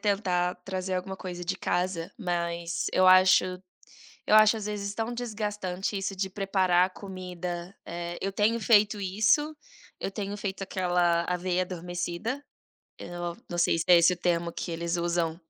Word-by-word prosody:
tentar 185 Hz, -4 st, 0 dB
trazer 185 Hz, -1 st, -3 dB
alguma 190 Hz, +1 st, -3 dB
coisa 180 Hz, -1 st, -6 dB
de 185 Hz, +2 st, -1 dB
casa, 175 Hz, -2 st, -1 dB
mas 170 Hz, -2 st, -2 dB
eu 185 Hz, 0 st, +4 dB
acho 185 Hz, 0 st, +7 dB, 0.8 s
eu -, -, +1 dB
acho 215 Hz, +1 st, +7 dB
às 210 Hz, -2 st, -5 dB
vezes 205 Hz, -1 st, -3 dB
tão 225 Hz, +1 st, -2 dB
desgastante 210 Hz, -5 st, -3 dB
isso 195 Hz, 0 st, -3 dB
de 190 Hz, 0 st, -2 dB
preparar 190 Hz, -2 st, +2 dB
a 185 Hz, -, -5 dB
comida, 180 Hz, -1 st, -6 dB
eh, 170 Hz, 0 st, -5 dB
eu 195 Hz, -, -1 dB
tenho 215 Hz, +3 st, +2 dB
feito 210 Hz, -2 st, +4 dB
isso, 215 Hz, +11 st, +2 dB, 0.5 s
eu -, -, -2 dB
tenho 200 Hz, 0 st, -4 dB
feito 195 Hz, -1 st, -4 dB
aquela 175 Hz, -3 st, +1 dB
aveia 180 Hz, +1 st, 0 dB
adormecida. 180 Hz, +7 st, -4 dB, 0.6 s
Eu 175 Hz, -, -9 dB
não 175 Hz, -1 st, -4 dB
não 175 Hz, -, -3 dB
sei 165 Hz, -, +3 dB
se 165 Hz, -, 0 dB
é 180 Hz, -, +8 dB
esse 170 Hz, +2 st, +5 dB
o 180 Hz, -, -7 dB
termo 170 Hz, -1 st, 0 dB
que 170 Hz, -, -5 dB
eles 170 Hz, +1 st, -2 dB
usam 170 Hz, -1 st, -1 dB
185 Hz, 165 wpm, -28 LUFS, 175-200 Hz, 0.8 s, é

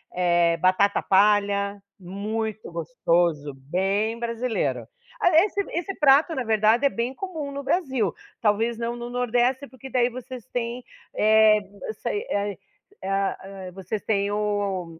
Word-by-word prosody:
eh, 175 Hz, -2 st, +3 dB
batata 190 Hz, +2 st, +3 dB
palha 200 Hz, 0 st, +2 dB, 0.2 s
muito 210 Hz, +4 st, -4 dB
gostoso, 165 Hz, -2 st, 0 dB
bem 195 Hz, +11 st, -1 dB
brasileiro. 235 Hz, 0 st, -2 dB, 0.3 s
A -, -, +4 dB, 0.2 s
esse 405 Hz, -1 st, -1 dB
esse 355 Hz, +3 st, -3 dB
prato, 295 Hz, +3 st, +5 dB
na 260 Hz, -, -1 dB
verdade, 220 Hz, +3 st, +3 dB
é -, -, +5 dB
bem 240 Hz, 0 st, -2 dB
comum 320 Hz, -4 st, -5 dB
no 280 Hz, 0 st, -5 dB
Brasil. 265 Hz, -, 0 dB, 0.3 s
Talvez 225 Hz, +1 st, +1 dB
não 235 Hz, +1 st, -3 dB
no 240 Hz, 0 st, -6 dB
Nordeste, 245 Hz, +2 st, 0 dB
porque 260 Hz, +1 st, -11 dB
daí 250 Hz, -2 st, +2 dB
vocês 255 Hz, -1 st, -8 dB
têm, 240 Hz, +1 st, -3 dB, 0.3 s
eh 215 Hz, 0 st, +5 dB, 0.3 s
eu 440 Hz, -, -3 dB
sei. 415 Hz, -, -3 dB
É -, -, +1 dB, 0.2 s
a -, -, -17 dB, 0.4 s
é 190 Hz, -, -4 dB
a 195 Hz, 0 st, 0 dB, 0.3 s
hã, -, -, -13 dB
vocês 195 Hz, +3 st, -5 dB
têm 200 Hz, -1 st, 0 dB
o 200 Hz, -5 st, -2 dB
220 Hz, 150 wpm, -25 LUFS, 195-250 Hz, 0.4 s, prato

